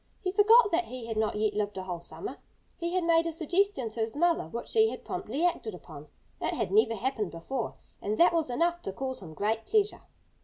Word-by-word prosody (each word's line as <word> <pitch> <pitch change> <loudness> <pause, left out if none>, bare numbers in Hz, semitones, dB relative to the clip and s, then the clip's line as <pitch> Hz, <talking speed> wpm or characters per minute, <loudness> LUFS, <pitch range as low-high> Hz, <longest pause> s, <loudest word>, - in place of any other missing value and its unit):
He 370 - 0
forgot 420 +3 +6
that 345 +1 +2
he 250 -2 -7
had 225 -1 -4
not 215 -1 0
yet 215 0 +1
lived 205 -1 -2
a 190 - -3
whole 180 -2 -4
summer. 390 - -7 0.4
He 340 +1 -2
had 365 - +2
made 335 0 +4
a - - -1
suggestion 330 - 0
to 220 - -8
his 225 +4 -1
mother 340 - +2
which 235 +8 -6
she 445 -1 +4
had - - -8
promptly 330 - -2
acted 240 - -1
upon. 155 -4 -11 0.3
It - - -1
had - - -2
never 405 - +4
happened 225 -3 -1
before. 225 +9 -4 0.3
And 210 +2 -1
that 345 - +6
was 325 -5 +1
enough 340 +7 +1
to 195 - -5
cause 260 +2 -4
him 160 -4 -10
great 220 +4 -1
pleasure. 420 0 +1
265 Hz, 225 wpm, -29 LUFS, 215-350 Hz, 0.4 s, forgot